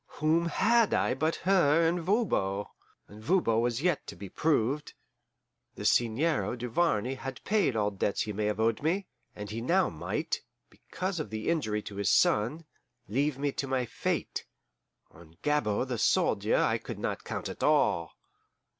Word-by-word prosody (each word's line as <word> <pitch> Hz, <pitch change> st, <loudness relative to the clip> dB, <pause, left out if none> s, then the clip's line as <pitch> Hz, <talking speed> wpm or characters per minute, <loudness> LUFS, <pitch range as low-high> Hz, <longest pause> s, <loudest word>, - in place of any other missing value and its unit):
Whom 160 Hz, +3 st, +2 dB
had 230 Hz, +5 st, +3 dB
I -, -, +1 dB
but 155 Hz, +5 st, 0 dB
her 165 Hz, -4 st, +4 dB
and 175 Hz, +2 st, +1 dB
Voban! 160 Hz, -, 0 dB, 0.4 s
and 105 Hz, +1 st, -13 dB
Voban 115 Hz, -9 st, +2 dB
was 120 Hz, +3 st, -1 dB
yet 180 Hz, -1 st, 0 dB
to -, -, -7 dB
be 95 Hz, +2 st, -9 dB
proved. 145 Hz, -, 0 dB, 0.8 s
The -, -, -7 dB
Seigneur 120 Hz, -1 st, +2 dB
Duvarney 125 Hz, 0 st, 0 dB
had 135 Hz, 0 st, -7 dB
paid 205 Hz, -, +1 dB
all 105 Hz, -1 st, +1 dB
debts 100 Hz, 0 st, -1 dB
he 105 Hz, -, -4 dB
may 105 Hz, +1 st, -1 dB
have 105 Hz, 0 st, -1 dB
owed 110 Hz, 0 st, +1 dB
me, 180 Hz, +6 st, 0 dB, 0.3 s
and 105 Hz, 0 st, -7 dB
he 115 Hz, +2 st, -4 dB
now 180 Hz, +9 st, +2 dB
might, 75 Hz, -, -3 dB, 0.3 s
because 185 Hz, -1 st, -5 dB
of 155 Hz, -, -4 dB
the 110 Hz, +4 st, -3 dB
injury 110 Hz, -11 st, 0 dB
to 100 Hz, -, -8 dB
his 100 Hz, -2 st, +1 dB
son, 125 Hz, +11 st, +2 dB, 0.4 s
leave 140 Hz, +5 st, 0 dB
me 140 Hz, +1 st, -1 dB
to 135 Hz, -, -4 dB
my 130 Hz, -1 st, 0 dB
fate. -, -, -3 dB, 0.6 s
On 80 Hz, 0 st, -17 dB
Gabord 135 Hz, -5 st, +1 dB
the 120 Hz, -3 st, -2 dB
soldier -, -, +2 dB
I -, -, +2 dB
could -, -, -7 dB
not -, -, -3 dB
count -, -, -4 dB
at -, -, -8 dB
all. 100 Hz, -, +2 dB
130 Hz, 165 wpm, -29 LUFS, 105-165 Hz, 0.8 s, her